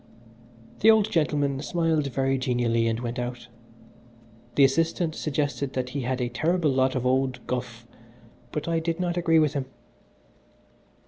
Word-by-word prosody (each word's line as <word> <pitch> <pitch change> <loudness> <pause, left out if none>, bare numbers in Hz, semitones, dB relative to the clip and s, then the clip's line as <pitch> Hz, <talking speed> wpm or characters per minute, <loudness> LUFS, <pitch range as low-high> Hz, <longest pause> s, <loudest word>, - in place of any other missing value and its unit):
The 220 - +5
old 220 -1 +4
gentleman 145 -6 +1
smiled 160 -2 0
very 135 0 0
genially 120 -2 +1
and 115 0 -1
went 120 +1 -4
out. 120 0 -5 1.1
The 140 - +5
assistant 165 +4 +2
suggested 145 -3 -2
that 125 -1 -2
he 140 +2 -3
had 130 +1 -2
a 125 - 0
terrible 155 +6 +1
lot 130 0 +1
of 130 -1 -2
old 130 0 +1
"guff," 120 -2 -4 0.7
but 150 - -4
I 165 -1 +1
did 165 +1 -2
not 175 -1 -1
agree 170 -2 +3
with 155 -2 +3
him. 140 -3 -3
135 Hz, 150 wpm, -26 LUFS, 125-165 Hz, 1.1 s, The